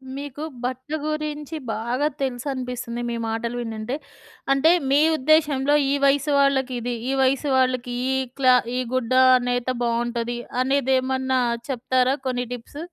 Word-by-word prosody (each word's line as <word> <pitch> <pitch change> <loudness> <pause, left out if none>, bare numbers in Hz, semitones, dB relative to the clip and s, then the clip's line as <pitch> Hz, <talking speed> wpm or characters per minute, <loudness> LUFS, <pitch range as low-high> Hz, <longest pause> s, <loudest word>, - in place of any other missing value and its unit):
మీకు 285 +1 -6 0.2
భట్ట 255 +2 -4 0.2
గురించి 305 0 -3 0.2
బాగా 245 +6 -1
తెలుసు 255 0 -2
అనిపిస్తుంది, 250 -2 -5
మీ 235 - -2
మాటలు 230 +2 -3
వినుంటే. 225 +2 -4 0.6
అంటే, 285 +4 +4 0.2
మీ 280 +2 +4 0.2
ఉద్దేశంలో 290 -1 +3 0.2
ఈ - - +2
వయసు 285 +1 +2
వాళ్ళకిది, 260 -3 +1 0.2
ఈ - - +1
వయసు 270 +2 +1
వాళ్ళకి 255 -1 0 0.2
ఈ - - +1 0.2
క్లా 255 -2 +6 0.2
ఈ - - +1
గుడ్డ 255 -1 0 0.2
అనైతే 245 +1 -1
బావుంటది, 235 0 -1 0.2
అనేదేమన్నా 260 -1 +1 0.3
చెప్తారా 255 +1 +1
కొన్ని 250 -1 -1
టిప్స్? 245 +4 -9
255 Hz, 130 wpm, -23 LUFS, 245-275 Hz, 0.6 s, క్లా